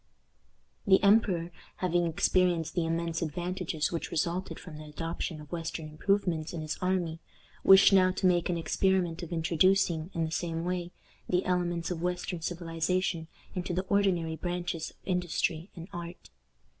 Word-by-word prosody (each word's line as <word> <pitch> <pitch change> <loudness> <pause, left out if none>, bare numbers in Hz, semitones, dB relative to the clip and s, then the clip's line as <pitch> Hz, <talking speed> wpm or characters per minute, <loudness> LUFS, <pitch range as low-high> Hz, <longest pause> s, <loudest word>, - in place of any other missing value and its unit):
The 190 0 +6
emperor 195 -5 +4 0.2
having 175 -1 +1
experienced 170 0 +2
the 170 -2 0
immense 165 0 -1
advantages 175 -1 -2
which 170 - -3
resulted 170 +3 -2
from 165 -4 -10
the 155 - -9
adoption 165 +1 -4
of 150 -1 -12
western 165 -2 -4
improvements 165 0 0
in 165 - -4
his 155 -1 -3
army, 180 -3 0 0.4
wished 195 +1 +8
now 185 -1 +6
to 185 - -2
make 175 -2 +3
an 175 - 0
experiment 175 0 +1
of 170 - -7
introducing, 170 0 +2
in 165 -1 +1
the 160 - -5
same 165 0 -2
way, 180 -1 -2 0.4
the 180 0 +1
elements 175 -1 0
of 165 -2 -3
western 180 -1 -2
civilization 170 0 -1 0.3
into 180 -1 -3
the 185 +1 -1
ordinary 180 -5 +2
branches 175 -1 -3
of - - -22
industry 175 -1 -1
and 170 -1 -8
art. 170 0 -8
175 Hz, 155 wpm, -30 LUFS, 165-180 Hz, 0.4 s, wished